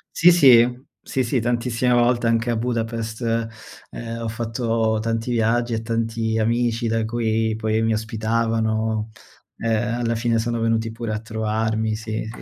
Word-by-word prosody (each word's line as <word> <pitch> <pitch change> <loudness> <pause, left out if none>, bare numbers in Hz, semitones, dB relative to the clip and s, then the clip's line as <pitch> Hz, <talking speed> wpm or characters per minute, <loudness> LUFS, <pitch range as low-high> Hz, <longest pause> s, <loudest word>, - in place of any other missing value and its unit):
Sì, 175 +1 +7
sì. 125 -5 +5 0.2
Sì, 130 - 0
sì 125 +1 0
tantissime 120 +1 0
volte 120 0 +3
anche 115 +1 +1
a 115 - +1
Budapest 115 -1 -3 0.7
ehm, 115 0 -6
ho 115 - -3
fatto 115 -1 -1
tanti 115 +2 -2
viaggi 120 +1 +1
e 110 - -1
tanti 115 -1 -1
amici 115 +1 0
da 115 0 0
cui 110 -1 0
poi 110 0 0
mi 115 0 +1
ospitavano, 110 0 -1 0.5
ehm, 115 +1 0
alla 115 0 0
fine 115 0 +1
sono 115 +1 -1
venuti 115 0 0
pure 115 -1 -4
a 110 - -3
trovarmi. 110 0 -1
Sì, 110 0 -4
sì, 110 - -9
115 Hz, 155 wpm, -22 LUFS, 110-120 Hz, 0.7 s, Sì